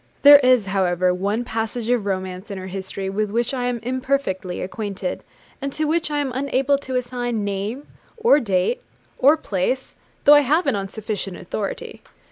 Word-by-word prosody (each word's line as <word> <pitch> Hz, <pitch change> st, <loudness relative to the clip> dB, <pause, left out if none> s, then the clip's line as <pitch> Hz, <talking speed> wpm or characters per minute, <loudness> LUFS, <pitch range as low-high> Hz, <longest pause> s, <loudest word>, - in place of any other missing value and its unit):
There 285 Hz, 0 st, +10 dB
is, 255 Hz, -5 st, +4 dB
however, 185 Hz, -2 st, +1 dB
one 200 Hz, +6 st, -1 dB
passage 225 Hz, 0 st, -3 dB
of 230 Hz, -5 st, +1 dB
romance 185 Hz, +1 st, -3 dB
in 200 Hz, -, -5 dB
her 185 Hz, -, -6 dB
history 190 Hz, +1 st, -5 dB
with 205 Hz, +2 st, -1 dB
which 235 Hz, +4 st, -1 dB
I 250 Hz, -2 st, -1 dB
am 245 Hz, -1 st, 0 dB
imperfectly 250 Hz, -8 st, -2 dB
acquainted, 195 Hz, -1 st, -4 dB, 0.4 s
and 275 Hz, 0 st, -3 dB
to 310 Hz, -, -1 dB
which 320 Hz, +1 st, 0 dB
I 295 Hz, -, -1 dB
am 285 Hz, -3 st, -1 dB
unable 275 Hz, +1 st, +1 dB
to 260 Hz, -2 st, -5 dB
assign 245 Hz, -3 st, -2 dB
name, 205 Hz, +7 st, -3 dB, 0.3 s
or 440 Hz, -9 st, +5 dB
date, 220 Hz, -, 0 dB, 0.4 s
or 290 Hz, +4 st, +6 dB
place, 255 Hz, +1 st, -2 dB, 0.3 s
though 290 Hz, -, +8 dB
I 290 Hz, -, +8 dB
have 305 Hz, +6 st, +2 dB
it 275 Hz, -, +2 dB
on 195 Hz, -1 st, -3 dB
sufficient 205 Hz, -3 st, -4 dB
authority. 200 Hz, +3 st, -5 dB
230 Hz, 175 wpm, -22 LUFS, 195-270 Hz, 0.4 s, There